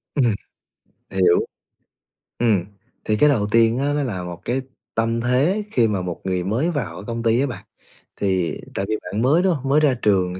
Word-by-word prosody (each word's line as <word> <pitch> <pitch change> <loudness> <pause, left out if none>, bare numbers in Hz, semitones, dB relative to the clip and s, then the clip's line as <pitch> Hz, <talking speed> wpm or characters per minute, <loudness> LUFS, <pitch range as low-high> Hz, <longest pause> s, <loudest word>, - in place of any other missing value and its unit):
Ừm, 120 -7 +3 0.8
hiểu. 90 -2 +3 1.0
Ừm, 105 -7 +2 0.4
thì 110 - +1
cái 150 - +5
đầu 110 -8 +2
tiên 115 +1 +4
á, 145 +1 0
nó 145 - 0
là 100 -9 -3
một 90 -1 -7
cái 130 +2 0 0.3
tâm 115 +1 0
thế 140 - +2
khi 115 -3 +3
mà 100 -3 -1
một 90 -1 -5
người 90 -1 -1
mới 115 - 0
vào 120 - -3
ở 90 - -8
công 115 0 -3
ty 115 +1 +3
á 135 - +2
bạn. 125 - -7 0.5
Thì 95 -4 0 0.2
tại 95 - -1
vì 110 - +1
bạn 105 - -3
mới, 150 +9 +4
đúng 190 - +3
hông? 135 -1 -4
Mới 145 +2 +5
ra 150 -4 +3
trường 95 -3 +1
115 Hz, 200 wpm, -22 LUFS, 95-135 Hz, 1.0 s, cái